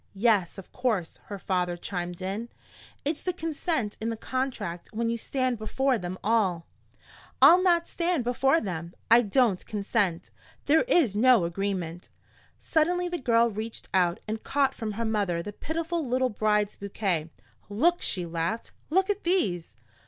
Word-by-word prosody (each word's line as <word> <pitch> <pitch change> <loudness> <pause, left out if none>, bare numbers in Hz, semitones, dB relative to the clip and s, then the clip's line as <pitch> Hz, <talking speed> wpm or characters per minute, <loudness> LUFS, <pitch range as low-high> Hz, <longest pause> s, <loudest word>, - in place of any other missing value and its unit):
"Yes, 200 -4 +2
of 195 - -11
course," 220 -10 -1
her 205 - -6
father 180 -2 -1
chimed 175 0 -5
in. 205 +5 -4 0.6
"It's 300 +1 -1
the 365 - -2
consent 315 - -2
in 225 - -1
the 225 - -3
contract 220 -9 -3
when 230 +1 -1
you 235 - -1
stand 255 -1 -1
before 255 +3 0
them 180 +1 -5
all." 195 -6 +1 0.7
"I'll 360 +2 +8
not 345 -2 +3
stand 340 -5 0
before 265 +5 +2
them. 170 - -5 0.2
I 235 +1 +8
don't 220 -3 +2
consent! 200 -4 -1 0.3
There 310 +3 +5
is 300 - +3
no 235 -4 +5
agreement!" 175 -1 -3 0.5
Suddenly 355 +2 +1
the 350 -1 -3
girl 235 -2 +3
reached 220 +2 -6
out 180 -2 +2
and 220 +1 -3
caught 275 -1 +1
from 220 -5 -4
her 230 +3 -2
mother 200 -6 0
the 205 - -6
pitiful 330 +5 -3
little 255 0 +1
bride's 210 -1 0
bouquet. 190 -5 -2 0.4
"Look!" 330 +13 +2
she 180 -2 +1
laughed. 170 +6 -3 0.2
"Look 380 +4 +3
at 410 0 -4
these!" 185 - 0
220 Hz, 155 wpm, -27 LUFS, 190-270 Hz, 0.7 s, I'll